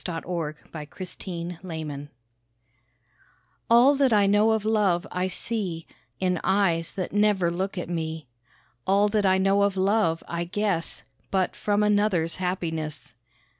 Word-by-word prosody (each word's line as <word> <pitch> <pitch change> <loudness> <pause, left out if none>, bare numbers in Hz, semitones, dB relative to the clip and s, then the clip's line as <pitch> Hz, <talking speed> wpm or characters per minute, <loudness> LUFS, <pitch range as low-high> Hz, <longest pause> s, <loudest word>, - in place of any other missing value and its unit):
THE 175 - -4
SONG - - -4
OF 165 -4 -5
THE 170 +5 -8
YOUNG 170 -1 -5
PAGE 155 -5 -6 1.6
All 240 +4 +7
that 275 -2 +2
I 205 -2 +5
know 205 +3 +4
of 220 -1 -1
love 200 -5 +2
I 180 +1 -1
see 185 -4 -3 0.3
In 180 -2 +1
eyes 175 -4 +1
that 185 -2 -4
never 205 -4 +3
look 190 +3 -3
at 175 - -3
me; 160 -2 -4 0.6
All 200 +2 +4
that 205 -2 +2
I 190 0 +4
know 195 +1 +3
of 200 -1 +1
love 190 -4 +2
I 170 0 -2
guess 190 -2 -2 0.3
But 190 -2 0
from 205 0 +1
another's 205 -6 +2
happiness. 160 -6 -3
185 Hz, 145 wpm, -26 LUFS, 170-205 Hz, 1.6 s, All